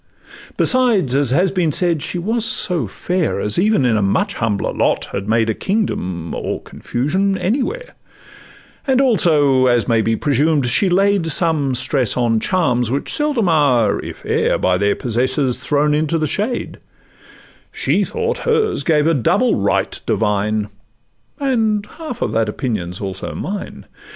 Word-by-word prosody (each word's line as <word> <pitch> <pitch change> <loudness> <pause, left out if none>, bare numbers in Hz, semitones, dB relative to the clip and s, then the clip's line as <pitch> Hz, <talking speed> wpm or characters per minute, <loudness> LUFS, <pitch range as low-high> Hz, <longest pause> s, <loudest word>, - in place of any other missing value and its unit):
Besides, 235 - +2
as 140 -2 +1
has 175 +9 +2
been 175 -5 0
said, 170 -1 +1
she 180 - -1
was 220 +6 -1
so 180 - +2
fair 175 - -2
As 105 +9 +1
even 205 -7 +2
in 115 -3 +2
a - - 0
much 195 - 0
humbler 110 - -2
lot - - 0
had 100 +2 -5
made 115 0 +2
A 110 - 0
kingdom 95 - -3
or - - -4
confusion 190 +11 -2
anywhere, 280 - -3 0.9
And 265 -1 +2
also, 150 - +3
as 120 -2 +2
may 115 -2 +2
be 115 +1 0
presumed, 145 +3 +1
she 155 - +3
laid 195 -1 +2
Some 155 -4 +2
stress 130 -1 +2
on 115 -2 +1
charms, 125 - 0
which 135 +3 -1
seldom 290 -9 +1
are, 140 -9 +2
if - - -9
e'er, - - +1
By 90 0 0
their 100 0 +1
possessors 125 +2 -1
thrown 150 0 +1
into 155 +2 0
the 155 - -1
shade: 215 - -3 0.9
She - - 0
thought 470 0 -3
hers 450 - 0
gave 150 0 +2
a 165 - +3
double 130 -7 +1
'right - - -1
divine;' 105 0 -1 0.7
And 225 -7 0
half 275 0 -7
of - - -2
that 110 -1 0
opinion 105 -7 -3
's - - -9
also 95 -1 -5
mine. 200 +1 -6
150 Hz, 155 wpm, -18 LUFS, -, 0.9 s, also